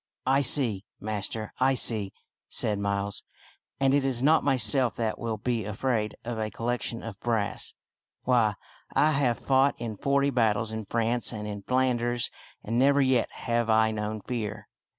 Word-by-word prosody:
" - - -59
I 135 +2 +3
see, 120 -8 +3 0.2
master, 110 +1 -3
I 135 +1 +3
see," 105 -6 +1 0.4
said 105 -2 +2
Miles; 100 0 -2 0.3
" - - -36
and 135 0 +3
it 140 -1 +3
is 130 -2 -1
not 155 +3 +4
myself 125 -2 +3
that 110 -2 -2
will 115 -2 -3
be 115 +1 -1
afraid 105 +1 -2
of 115 -1 -4
a 110 0 -2
collection 120 0 -3
of 110 -4 -8
brass. 110 -4 -2 0.5
Why, 115 -5 +2 0.4
I 155 - +4
have 135 -5 +1
fought 135 +1 +2
in 115 -2 -5
forty 140 +5 +1
battles 115 -3 +1
in 110 -1 -5
France 115 +3 0
and 105 -2 -5
in 100 -1 -5
Flanders, 120 0 0 0.3
and 115 +3 -1
never 140 +2 +4
yet 130 -3 +2
have 120 -1 -1
I 110 0 +4
known 105 0 -4
fear." 110 -2 -5
115 Hz, 170 wpm, -27 LUFS, 110-130 Hz, 0.5 s, not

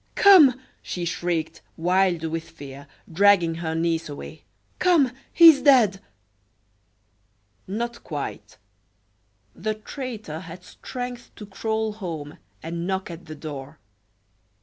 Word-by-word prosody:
"Come!" 310 -11 +7 0.2
she 175 -1 -5
shrieked, 170 -2 -2 0.2
wild 180 0 +2
with 165 0 -4
fear, 140 -3 -11 0.3
dragging 190 -2 +4
her 160 -1 -2
niece 165 -1 -1
away. 145 - -9 0.4
"Come 330 -9 +4 0.2
he 335 0 +9
is 280 -4 +5
dead!" 245 -9 +4 1.7
Not 235 +5 -4
quite. 145 -3 -6 1.0
The 215 0 -3
traitor 220 - -7
had 175 +1 -11
strength 245 +3 -7
to 210 - -9
crawl 220 +2 -2
home 165 -8 -7 0.2
and 170 +2 -4
knock 190 -1 -2
at 170 +1 -10
the 155 - -8
door. 145 -1 -8
185 Hz, 115 wpm, -24 LUFS, 165-225 Hz, 1.7 s, he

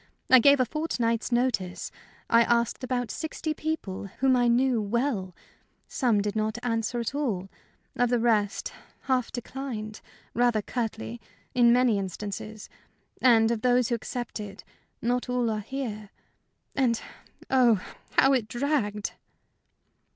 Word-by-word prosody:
I 260 - +10
gave 280 +3 +6
a 255 - +4
fortnight's 240 -6 -1
notice; 240 -7 0 0.4
I 230 0 +5
asked 235 +2 +1
about 245 -2 -1
sixty 315 0 -3
people, 300 -13 -4
whom 265 0 +3
I 245 -1 +3
knew 240 0 +3
well. 210 -4 -1 0.5
Some 235 -6 +1
did 205 +1 -2
not 215 +1 -1
answer 230 0 -1
at 235 +2 -2
all. 220 -11 -2 0.5
Of 245 -1 +2
the 245 - +3
rest, 220 -4 +1 0.3
half 255 -3 0
declined 240 -4 -6 0.3
rather 240 -2 +2
curtly, 120 - -4 0.3
in 240 -1 +5
many 245 -4 +4
instances. 205 +3 -6 0.5
And 230 -3 +5
of 230 -2 -1
those 250 -1 +3
who 240 - +2
accepted, 215 -4 -6 0.4
not 245 +2 0
all 245 -2 +1
are 215 - -1
here. 215 -3 -5 0.7
And, 245 -4 +2 0.5
oh, 245 -6 +5 0.4
how 270 +1 +6
it 245 -5 +1
dragged!" 240 -5 -1
235 Hz, 130 wpm, -27 LUFS, 215-255 Hz, 0.7 s, I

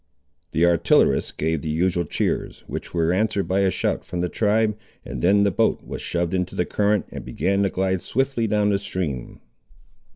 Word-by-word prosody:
The 80 +3 +2
artillerists 85 -1 +3
gave 80 -1 -1
the 80 - -4
usual 85 +2 +1
cheers, - - -2
which - - -6
were 85 0 +1
answered 100 0 0
by 95 +1 +1
a 95 -1 +3
shout - - -1
from 90 -1 -4
the 90 - -1
tribe, 110 +1 +1 0.3
and - - -5
then 100 +3 +4
the 100 - +3
boat - - +1
was - - -6
shoved 85 0 -2
into 90 -1 -1
the 90 - +1
current, 105 -1 +1
and - - -7
began 100 +1 0
to 100 - +2
glide 95 -1 0
swiftly 135 -2 0
down 105 -1 +2
its 100 - 0
stream. 75 -10 -4
95 Hz, 190 wpm, -23 LUFS, 85-105 Hz, 0.3 s, then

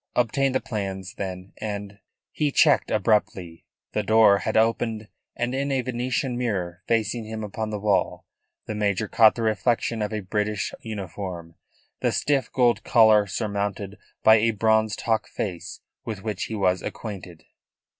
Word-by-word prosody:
Obtain 135 +3 +2
the 130 - +2
plans, 95 -3 -5
then, 95 -1 -6
and 100 -1 -5 0.2
" - - -64
He 150 -2 0
checked 145 0 +4
abruptly. 105 -6 0 0.2
The 105 - 0
door 105 -1 +5
had - - -1
opened, 110 -1 +1 0.3
and 120 +1 -2
in 140 +1 -1
a 135 -1 +1
Venetian 125 +1 -2
mirror 90 -7 -2
facing 115 0 0
him 110 0 -5
upon 110 +1 -4
the 105 - -3
wall 100 -2 0 0.4
the - - -4
major 105 0 0
caught 110 0 +5
the 115 - -3
reflection 115 +1 0
of 105 - -2
a 110 -1 -3
British 105 +1 -2
uniform, 95 -5 -6 0.5
the - - +1
stiff 140 -4 0
gold 120 -2 +2
collar 110 -3 +5
surmounted 100 0 -3 0.2
by 110 0 +7
a 115 +2 +2
bronzed 110 0 +1
hawk 115 -1 0
face 90 -5 -5 0.2
with 105 -4 -6
which 105 -3 -3
he 110 - -5
was 95 -3 +1
acquainted. 95 -6 -7
110 Hz, 155 wpm, -25 LUFS, 100-115 Hz, 0.5 s, by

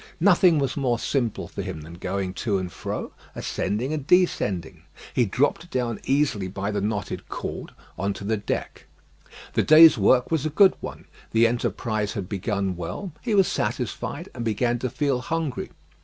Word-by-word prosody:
Nothing 180 -2 +5
was 135 -3 0
more 125 -4 +1
simple 120 -2 -1
for - - -6
him 80 - -5
than 80 +2 -10
going 95 +2 -3
to 100 +2 -1
and 90 -2 -4
fro, 95 - -5 0.2
ascending 110 +9 -2
and 150 -2 -4
descending. 105 - +1 0.3
He 120 - +3
dropped 145 - 0
down 120 -7 -2
easily 135 -9 +1
by 100 +2 -3
the 100 -1 -1
knotted 105 0 -3
cord - - -5 0.3
on 100 +2 0
to 100 - -9
the 110 +2 0
deck. 105 - -4 0.7
The - - +3
day's 155 -4 +8
work 125 +8 +4
was 160 -4 +1
a 155 - 0
good 190 +5 +6
one, - - -7 0.3
the 115 +1 +5
enterprise 110 -2 -1
had 95 -3 -4
begun 100 -1 -2
well; 90 - -5
he 225 -4 0
was 195 -2 +5
satisfied, - - -3
and 120 - -5
began 120 +2 0
to 130 - -2
feel 130 0 0
hungry. 160 -2 -3
120 Hz, 170 wpm, -25 LUFS, 100-145 Hz, 0.7 s, day's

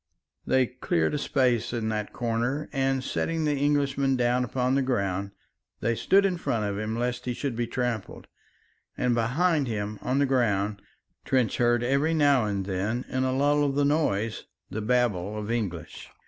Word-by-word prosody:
They 130 -1 +4
cleared 100 -10 -1
a 150 - 0
space 125 -5 +1
in 115 -2 -1
that 105 -1 -3
corner 120 +5 -1
and, 135 -1 0
setting 165 +3 -1
the 150 - +2
Englishman 140 -1 +1
down 125 0 +2
upon 125 +1 0
the 135 - +3
ground, 100 -6 -1 0.5
they 115 +2 +1
stood 195 - +3
in 185 -2 +1
front 115 -9 -1
of 100 0 -2
him 110 +1 -3
lest 120 0 -2
he 125 -1 -2
should 135 -2 -3
be 120 0 -1
trampled. 120 -5 -3 0.7
And 125 -1 +1
behind 140 +6 +1
him 105 -2 -3
upon 130 +5 -1
the 140 - +3
ground 105 -6 +1 0.4
Trench 130 -4 +1
heard 120 0 +2
every 140 +6 +1
now 140 -6 +4
and 100 -2 -2
then 100 +6 -2
in 130 0 0
a 130 - +1
lull 145 +2 +2
of 140 -1 0
the 145 0 +2
noise 115 -8 0 0.3
the 110 - -3
babble 105 -4 0
of 105 +1 -4
English. 95 -9 -4
125 Hz, 175 wpm, -27 LUFS, 110-135 Hz, 0.7 s, They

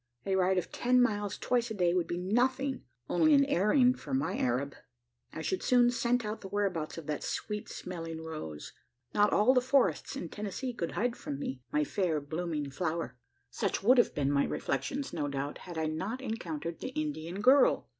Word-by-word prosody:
A 195 -1 +1
ride 190 0 +3
of 180 - -2
ten 250 +1 +2
miles 205 -4 +1
twice 240 -1 0
a 220 - -4
day 175 -3 +2
would 175 -2 +1
be 175 - -2
nothing 255 +8 +1 0.3
only 300 - +4
an 280 0 +5
airing 250 +3 +4
for 145 - -4
my 145 +8 0
Arab. 130 +3 0 0.6
I 160 - -6
should 190 - -1
soon 245 -1 +4
scent 245 -1 +1
out 210 +1 -4
the 195 - -7
whereabouts 190 -6 -2
of 165 - -7
that 150 0 -3
sweet 210 -1 -4
smelling 165 -3 -6
rose. 155 - -7 0.4
Not 210 0 +4
all 215 +6 +5
the 250 - +4
forests 250 - +2
in 170 - -5
Tennessee 210 +6 -4
could 170 -7 -3
hide 240 +2 0
from 140 - -5
me 135 -2 -5
my 150 - +2
fair 165 0 0
blooming 150 -1 -3
flower. 160 -4 -2 0.4
Such - - -1
would 250 +4 +6
have - - +3
been 140 -1 +1
my 140 0 +3
reflections, 260 - -2
no 150 -4 -1
doubt, 140 +1 -4
had 170 - -6
I 160 - 0
not 185 +11 -3
encountered 170 - -4
the - - -4
Indian 155 +4 -4
girl. 260 +5 +5
185 Hz, 195 wpm, -31 LUFS, 155-240 Hz, 0.6 s, would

